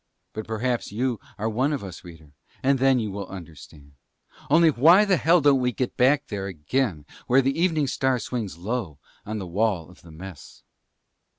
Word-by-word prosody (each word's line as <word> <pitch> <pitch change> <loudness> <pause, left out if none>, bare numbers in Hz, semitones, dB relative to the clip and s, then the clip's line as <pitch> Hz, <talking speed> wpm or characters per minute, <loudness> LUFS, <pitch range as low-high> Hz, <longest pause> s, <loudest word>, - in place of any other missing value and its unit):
But 110 0 -6
perhaps 115 +2 -2
you 120 +2 -1 0.2
are 110 - -2
one 125 +6 0
of 140 -7 -3
us, 95 -2 -9
reader, 80 -4 -14 0.3
and 135 0 +3
then 135 0 +4
you 110 -4 -2
will 100 +1 -6
understand. 80 -5 -12 0.6
Only 165 +2 +5
why 165 - +6
the 195 -3 +3
hell 165 +2 +4
don't 140 -2 +4
we 125 -1 +1
get 125 +1 -3
back 140 +3 +3
there 100 -6 -5
again 90 - -2 0.2
where 130 +2 +4
the 135 +1 0
Evening 160 -5 +2
Star 130 -1 0
swings 115 -6 -4
low 95 - -4 0.3
on 110 +1 -3
the 100 - -5
wall 90 -2 -1
of 90 - -19
the 85 - -16
Mess? 80 -1 -11
115 Hz, 185 wpm, -25 LUFS, 95-135 Hz, 0.6 s, why